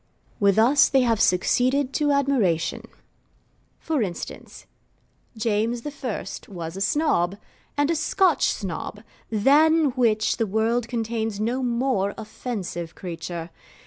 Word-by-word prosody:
With 200 -1 +3
us 265 +6 +5
they 270 -1 +4
have 230 -3 +2
succeeded 255 +9 +2
to 295 -2 +1
admiration. 240 - +1 0.9
For 315 -5 -1
instance, 185 -5 -6 0.7
James 225 +2 -1 0.2
I. 245 -5 -3 0.2
was 170 -3 -7
a 195 - -5
Snob, 200 - +1 0.4
and 290 +2 +2
a - - +1
Scotch 335 +2 +2
Snob, 205 +2 -5 0.3
than 295 +7 +4
which 225 -3 +1
the 225 - 0
world 225 +3 0
contains 225 -3 -2
no 240 +5 -1
more 235 -5 0
offensive 205 -6 -5
creature. 170 -1 -6
225 Hz, 115 wpm, -24 LUFS, 200-265 Hz, 0.9 s, us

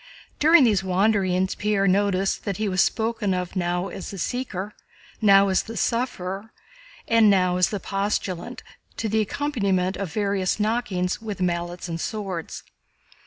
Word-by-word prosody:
During 315 0 +6
these 210 -6 +3
wanderings, 190 -1 +1
Pierre 205 -1 0
noticed 195 0 +1
that 200 -3 -3
he 215 0 -1
was 185 -2 +2
spoken 220 -4 0
of 180 +1 -4
now 180 +1 -1
as 190 - -7
the 195 - -7
"Seeker," 210 -2 -3 0.5
now 200 -2 +6
as 190 - +2
the 225 0 -8
"Sufferer," 220 -4 -2 0.6
and 230 -2 +5
now 185 -2 +3
as 180 - +3
the 205 - -3
"Postulant," 195 +3 -3 0.3
to 225 - -2
the 220 +1 +1
accompaniment 200 -7 -1
of 195 -5 -4
various 200 -1 0
knockings 210 -5 -1
with 215 -3 -5
mallets 175 0 -2
and 165 -1 -4
swords. 195 -6 -5
195 Hz, 150 wpm, -24 LUFS, 185-215 Hz, 0.6 s, During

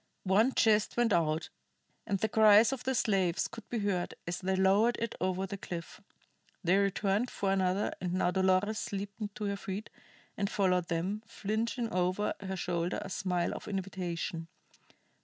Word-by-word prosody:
One 215 +7 +3
chest 215 -1 +3
went 240 -3 +3
out, 160 -1 +1 0.6
and 200 -2 +1
the 220 - 0
cries 220 +3 +6
of 260 - -6
the 265 0 +1
slaves 190 -7 +1
could 225 - -11
be 240 - -2
heard 200 -4 -1
as 175 +1 -3
they 190 0 0
lowered 195 +5 +4
it 230 -1 -2
over 185 +1 0
the 195 +1 -6
cliff. 175 +4 -7 0.6
They 180 +2 +4
returned 200 +3 +1
for 195 -1 -1
another, 190 +1 +1
and 180 -1 -1
now 180 -1 +2
Dolores 190 +3 +1
leaped 200 +1 -5
to 215 - -5
her 200 -1 -1
feet 200 +2 -6 0.4
and 200 0 -1
followed 180 -4 +1
them, 180 +5 -2
flinging 230 +2 -2
over 185 +3 +1
her 190 -1 -4
shoulder 175 -1 -1
a 195 - -8
smile 180 -2 -1
of - - -8
invitation. 180 -4 -3
195 Hz, 165 wpm, -31 LUFS, 180-210 Hz, 0.6 s, cries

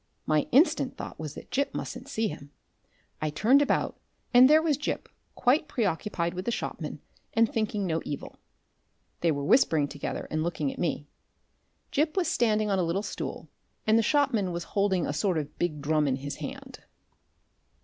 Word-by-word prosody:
My 155 -1 +2
instant 285 +8 +3
thought - - -7
was 155 -2 -6
that - - -11
Gip 280 +1 0
mustn't 260 - -5
see 225 -5 0
him. 150 -5 -8 0.7
I 155 - 0
turned 235 - +4
about, 285 - 0 0.3
and 250 +2 +8
there 310 +1 +7
was 315 -2 +2
Gip 295 - -3 0.3
quite 285 +5 +2
preoccupied 185 -6 -1
with 185 +1 -5
the 235 - 0
shopman, - - -4 0.3
and 230 0 +5
thinking 210 -2 -1
no 165 -2 0
evil. 145 - -6 0.8
They 170 - +2
were 140 -2 -2
whispering 160 - +4
together 145 0 -5
and 155 - 0
looking 155 -4 -1
at - - -12
me. 155 -4 -1 0.9
Gip 310 +4 +1
was 365 - +2
standing 215 -3 +2
on 195 - +2
a - - +2
little 170 +4 -1
stool, - - -5 0.4
and 220 - +4
the 230 - +5
shopman 225 -7 +2
was 170 0 -3
holding 195 -4 +2
a - - -2
sort 175 +3 +1
of 150 -1 -5
big 150 -5 -1
drum 150 0 +2
in 130 - +1
his 140 +2 -6
hand. - - -8
190 Hz, 180 wpm, -28 LUFS, 155-240 Hz, 0.9 s, and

